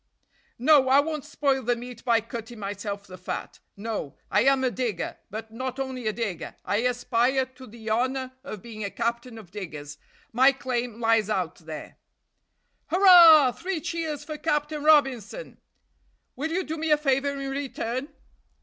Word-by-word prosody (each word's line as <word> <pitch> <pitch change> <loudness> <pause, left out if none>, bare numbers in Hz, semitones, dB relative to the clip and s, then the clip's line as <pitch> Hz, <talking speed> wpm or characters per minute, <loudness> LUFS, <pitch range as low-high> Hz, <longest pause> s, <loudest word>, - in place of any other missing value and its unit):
"No! 270 +1 +5
I 270 +2 +6
won't 305 -1 -1
spoil 280 -2 0
the 245 0 +1
meat 240 0 -9
by 235 -2 +3
cutting 230 +1 -8
myself 200 0 -5
the 185 -2 -11
fat 185 - -6 0.2
no! 205 -9 -5
I 210 - +3
am 270 -1 +4
a 255 - +2
digger, 235 -8 -3
but 220 +2 -7
not 255 +3 -5
only 260 -3 -4
a - - +2
digger, 210 -6 -4
I 205 - +1
aspire 250 +2 +1
to 260 0 -14
the 225 0 -12
honor 255 +3 0
of 215 -8 -8
being 220 -2 -7
a 200 - -2
captain 235 +2 -3
of 200 -6 -12
diggers; 155 -7 -7 0.3
my 260 +4 +6
claim 245 -3 -3
lies 225 -2 +2
out 185 -5 -1
there." 155 -2 -9 0.9
"Hurrah; 340 -7 +8
three 365 +5 -4
cheers 320 -2 -3
for 305 0 -7
Captain 295 -1 -1
Robinson!" 290 - +2 0.8
"Will 300 +5 -3
you 365 +3 -1
do 320 0 -5
me 320 0 -2
a 300 - +5
favor 280 -1 0
in 275 0 -4
return?" 265 -2 -3
250 Hz, 165 wpm, -26 LUFS, 220-280 Hz, 0.9 s, Hurrah